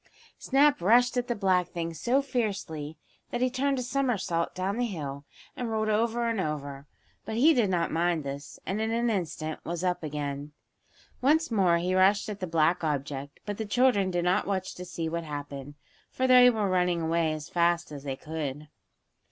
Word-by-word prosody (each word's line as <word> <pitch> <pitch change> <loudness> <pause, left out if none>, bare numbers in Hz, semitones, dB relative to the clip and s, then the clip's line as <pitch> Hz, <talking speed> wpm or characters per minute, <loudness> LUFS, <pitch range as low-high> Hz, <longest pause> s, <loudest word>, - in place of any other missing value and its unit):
Snap 280 -4 +3
rushed 245 +7 +4
at 245 -1 0
the 240 - -1
black 185 -4 +2
thing 170 -1 -4
so 250 - +1
fiercely 195 - -3 0.3
that 240 - -3
he 255 0 +1
turned 275 +2 0
a 255 - -2
somersault 240 -10 -1
down 190 +3 -2
the 245 - +1
hill, 145 -8 -6 0.3
and 245 -2 -3
rolled 215 -1 0
over 230 +2 +1
and 225 -4 0
over. 145 -3 -4 0.4
But 220 - -5
he 295 +8 +6
did 235 -8 +2
not 170 -2 0
mind 170 -1 +1
this, 140 +1 -7
and 200 +3 -2
in 220 - 0
an 235 +1 +1
instant 160 -5 -3
was 170 +1 -4
up 180 -1 0
again. 145 -1 -4 0.7
Once 310 +3 +3
more 185 -6 +3
he 180 +2 -1
rushed 195 +3 +3
at 205 -1 -5
the 185 - -3
black 165 +2 +2
object, 140 -2 -3
but 205 -1 -4
the 220 - -2
children 205 -4 +3
did 175 -1 -1
not 185 +3 +2
watch 190 -2 -2
to 180 - -8
see 170 -2 -4
what 170 +1 -3
happened, 145 -2 -7 0.3
for 260 - -1
they 250 -1 +8
were 220 -4 0
running 180 -2 +1
away 165 0 +1
as 155 0 -5
fast 170 -1 +1
as 145 -2 -7
they 135 -2 -3
could. 150 -1 -5
180 Hz, 195 wpm, -28 LUFS, 155-230 Hz, 0.7 s, they